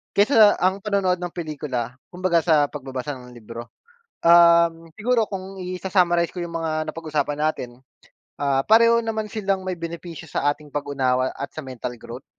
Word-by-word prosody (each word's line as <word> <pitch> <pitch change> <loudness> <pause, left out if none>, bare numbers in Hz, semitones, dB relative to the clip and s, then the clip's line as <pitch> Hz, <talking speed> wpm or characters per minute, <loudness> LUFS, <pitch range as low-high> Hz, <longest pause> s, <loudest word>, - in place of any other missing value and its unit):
kaysa 210 -1 +6
ang 190 +1 +2
panonood 195 -3 0
ng 175 -1 -5
pelikula, 135 -7 -4
kumbaga 180 -2 +1
sa 155 -3 +2
pagbabasa 135 -1 -5
ng 125 -1 -13
libro, 115 +1 -9 0.6
um 170 -1 +5
siguro 230 -1 +1
kung 190 -1 -6
isa-summarize 180 -2 +1
ko 175 - -4
yung 170 -1 -4
mga 155 -1 -2
napag-usapan 150 -3 -2
natin, 150 -5 -1 0.7
ah 140 -1 +1
pareho 230 +1 +6
naman 220 -2 -3
silang 195 -3 -1
may 185 -2 -4
benepisyo 170 -1 -7
sa 145 0 +1
ating 150 0 -15
pag-unawa 130 -3 0
at 140 - -3
sa 155 - -5
mental 125 -2 -6
growth. - - -10
170 Hz, 155 wpm, -23 LUFS, 145-185 Hz, 0.7 s, kaysa